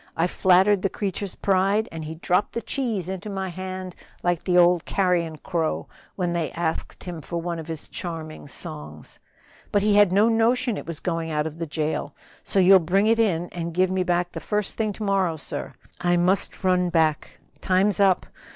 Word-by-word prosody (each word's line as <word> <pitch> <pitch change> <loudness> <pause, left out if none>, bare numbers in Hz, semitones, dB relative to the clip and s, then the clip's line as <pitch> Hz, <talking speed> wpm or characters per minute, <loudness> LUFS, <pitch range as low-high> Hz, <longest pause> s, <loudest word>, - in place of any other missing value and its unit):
I 165 - +3
flattered 185 +2 +4
the 195 - +1
creature's 200 -1 -4
pride, 195 +2 +2
and 165 -1 -6
he 155 +1 -6
dropped 180 +4 0
the 235 - -2
cheese 225 -8 -2
into 190 +2 -5
my 190 -1 -3
hand 185 0 -6 0.3
like 175 -1 0
the 180 -1 +2
old 175 -1 +5
carrion 175 -4 0
crow 165 -2 -2 0.3
when 175 -2 -1
they 170 -2 -1
asked 165 -1 -3
him 175 -3 -6
for 170 +4 -4
one 170 0 -3
of 160 - -8
his 160 -2 -6
charming 160 -4 -6
songs. 75 - -7 0.5
But 205 -1 +2
he 210 0 +3
had 205 -3 +6
no 205 +4 +4
notion 230 +1 +2
it - - -7
was 165 -2 -5
going 165 -2 -2
out 150 -1 0
of 160 +1 -6
the 165 - -3
jail; 150 -1 -2 0.3
so - - -1
you'll 190 0 +7
bring 185 +4 +2
it 225 +1 +3
in 175 -6 +1
and 170 -1 -5
give 185 0 +2
it - - -1
me 190 - +1
back 175 0 0
the - - -6
first 210 -1 -2
thing 215 -2 0
to 215 - -6
morrow, 190 -5 +1
sir. 150 - -6 0.3
I 175 0 +2
must 185 +3 +1
run 180 -1 +2
back, 160 -3 0 0.2
time's 190 +1 +2
up! 195 -2 +4
180 Hz, 200 wpm, -24 LUFS, 165-195 Hz, 0.5 s, you'll